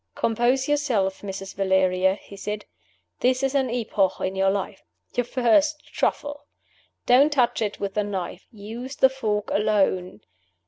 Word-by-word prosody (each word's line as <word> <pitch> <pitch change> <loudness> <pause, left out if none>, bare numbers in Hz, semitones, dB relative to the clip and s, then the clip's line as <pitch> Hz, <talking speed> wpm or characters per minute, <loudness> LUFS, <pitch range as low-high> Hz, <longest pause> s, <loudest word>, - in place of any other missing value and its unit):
"Compose 240 +4 +1
yourself, 240 -11 0
Mrs. 195 -1 -6
Valeria," 190 -1 +2
he 200 - -13
said. 210 +1 -5 0.5
"This 255 +1 +2
is 270 0 +1
an 265 -3 +1
epoch 215 -5 +1
in 190 +1 -2
your 195 0 +3
life. 195 0 -3 0.3
Your 245 - 0
first 270 +5 +2
Truffle! 290 0 -2 0.6
Don't 270 +5 +5
touch 255 -6 +2
it 210 -2 -2
with 200 -1 -3
the 210 - 0
knife. 190 -2 -5
Use 230 +5 -8
the 265 - +5
fork 215 -6 -2
alone. 195 - +1
215 Hz, 145 wpm, -24 LUFS, 195-260 Hz, 0.6 s, Don't